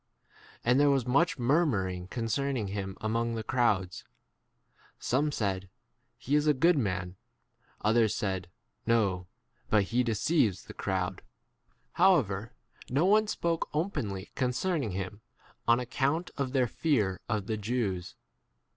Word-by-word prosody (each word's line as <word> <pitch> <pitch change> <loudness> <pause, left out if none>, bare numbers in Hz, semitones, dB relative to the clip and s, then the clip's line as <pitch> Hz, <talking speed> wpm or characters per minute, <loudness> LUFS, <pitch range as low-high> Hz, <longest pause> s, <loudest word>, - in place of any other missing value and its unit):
And 125 +3 +4
there 145 0 +5
was 135 -4 +2
much 145 +8 +2
murmuring 115 - +1
concerning 115 +1 -1
him 95 -1 -4
among 115 +1 0
the 110 - -3
crowds. 105 -8 0 0.9
Some 145 +4 0
said, 95 -6 -2 0.5
He 140 - -4
is 150 +1 +3
[a] 150 - +4
good 170 +6 +4
[man]; 95 -7 -2 0.6
others 110 0 +3
said, 95 -5 -2 0.4
No; 100 -6 +2 0.4
but 105 -2 +4
he 115 +6 +1
deceives 115 - +1
the - - -10
J - - -35
crowd. 95 -2 -2 0.7
However 115 - +3 0.4
no 140 +7 +2
one 215 +2 +4
spoke 170 -5 -1
openly 110 - -2
concerning 130 - 0
him 95 +2 -5 0.5
on 120 +1 +5
account 140 +7 -1
of 140 -2 -2
[their] 130 -2 +3
fear 110 - 0
of 105 -3 -1
the 110 -1 -2
Jews. 105 -5 -2
115 Hz, 130 wpm, -30 LUFS, 100-140 Hz, 0.9 s, there